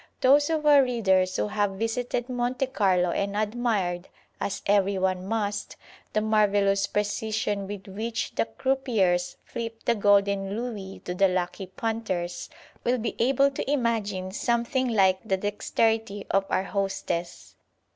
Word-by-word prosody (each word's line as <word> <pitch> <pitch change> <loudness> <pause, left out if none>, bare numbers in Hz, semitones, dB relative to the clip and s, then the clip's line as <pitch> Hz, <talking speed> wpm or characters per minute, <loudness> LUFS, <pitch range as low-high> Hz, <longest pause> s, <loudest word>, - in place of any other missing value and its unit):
Those 285 +3 +5
of 315 -2 -1
our 290 -2 +7
readers 190 -8 +2
who 105 0 0
have 205 -1 0
visited 240 +2 -2
Monte 250 +1 -1
Carlo 190 -8 +2
and 200 +2 -1
admired, 210 -5 -1 0.3
as 195 - -3
every 200 -1 +3
one 185 0 -1
must, 205 -1 -2 0.4
the 215 - +2
marvellous 205 -2 +2
precision 210 -1 -1
with 200 -1 -7
which 220 +4 -3
the - - +1
croupiers 220 -11 0
flip 230 -1 -6
the 235 - +4
golden 200 -2 +2
Louis 210 -5 -6
to 180 - -3
the 195 +2 +4
lucky 180 +1 -2
"punters," 190 -4 -3 0.3
will 245 +1 +2
be 225 -1 -3
able 270 +3 +3
to 270 - -4
imagine 215 -8 -1
something 235 +3 0
like 190 -5 +3
the 195 -4 0
dexterity 205 +1 0
of 195 0 +2
our 185 - +1
hostess. 175 - -3
205 Hz, 140 wpm, -26 LUFS, 190-235 Hz, 0.4 s, our